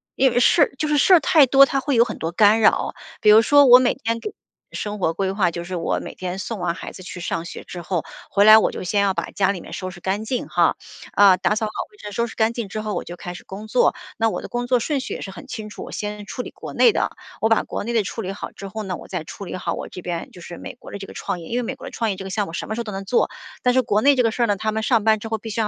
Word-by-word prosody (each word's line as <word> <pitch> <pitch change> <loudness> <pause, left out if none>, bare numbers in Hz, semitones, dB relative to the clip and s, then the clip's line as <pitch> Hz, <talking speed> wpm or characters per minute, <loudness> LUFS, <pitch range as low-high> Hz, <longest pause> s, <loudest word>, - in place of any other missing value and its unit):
因 265 -1 +3
为 - - +2
事 275 +6 +4
儿 - - 0
就 305 - -1
是 295 - +2
事 370 - +5
儿 355 - +8
太 305 0 +5
多， 275 +2 +7
它 275 - -1
会 275 0 -1
有 235 - +6
很 225 - -6
多 165 +1 -2
干 210 +4 +5
扰。 215 - +3 0.3
比 210 - +5
如 220 - +8
说 285 +5 +6
我 250 0 +9
每 250 -1 +2
天 230 +1 -2
给 420 - -6 0.4
生 210 -1 -4
活 165 -2 +1
规 190 +2 -1
划， 195 -3 +2
就 170 +1 -5
是 180 +1 -5
我 165 - -1
每 - - -7
天 185 0 -5
送 215 0 -5
完 175 -1 -1
孩 - - -7
子 - - -12
去 180 -1 -8
上 165 0 -3
学 - - -8
之 175 - -8
后， 170 -1 -2 0.3
回 200 - +3
来 215 +1 +10
我 220 - +3
就 - - -6
先 200 +3 +1
要 200 -1 +2
把 - - -2
家 195 -1 +1
里 180 - -7
面 - - -12
收 185 - -5
拾 180 -1 -13
干 200 +4 -2
净 250 +2 -2
哈， - - +3 0.4
呃， 195 -2 +7
打 190 +3 +1
扫 220 0 -1
好 210 - -7 0.2
卫 415 - -21
生， 205 - -8
收 235 +3 -1
拾 - - -11
干 220 0 +2
净 235 -3 -4
之 215 +2 -5
后 215 -1 -3
我 - - -3
就 175 +1 -7
开 175 0 -7
始 180 - -11
工 205 +3 -8
作。 245 +3 +3 0.2
那 225 0 +2
我 - - -4
的 - - -8
工 240 0 -3
作 250 -1 +3
顺 290 +1 -1
序 - - -5
也 - - -6
是 195 - -6
很 270 - -11
清 220 -5 -6
楚， - - -8
我 - - -10
先 210 0 -5
处 250 - -5
理 - - -8
国 - - -9
内 470 - +5
的， - - -1 0.3
我 220 - +2
把 225 0 +3
国 - - -5
内 235 - -3
的 225 - +2
处 210 +4 -5
理 195 0 -4
好 - - -7
之 200 - -9
后 215 +2 -6
呢， 185 -3 -4
我 - - -12
再 180 -4 -4
处 195 +5 -9
理 - - -6
好 185 - -3
我 - - -5
这 180 - -9
边 170 -1 -4
就 180 - -13
是 170 0 -9
美 - - -8
国 - - -13
的 - - -5
这 195 -1 -8
个 - - -11
创 180 - -4
业。 165 - -10
因 235 - -2
为 250 - 0
美 - - -4
国 - - -10
的 - - -8
创 225 -2 -1
业 190 - -5
这 195 - -7
个 - - -6
项 205 +1 -1
目 165 - -9
什 170 - -5
么 220 - -3
时 - - -5
候 - - -1
都 215 - -6
能 195 0 -6
做， 235 - +2 0.3
但 250 - +3
是 260 - +4
国 210 -2 +1
内 280 +2 +5
这 250 - +5
个 230 - +2
事 240 +2 0
儿 - - +2
呢， 205 -2 +1
他 215 +2 -2
们 220 0 -2
上 225 -3 +2
班 220 -1 +5
之 225 - -7
后， 220 - -1
必 225 +1 -8
须 220 +2 -1
要 - - +2
让 - - 0
215 Hz, 370 characters per minute, -22 LUFS, 190-235 Hz, 0.4 s, 来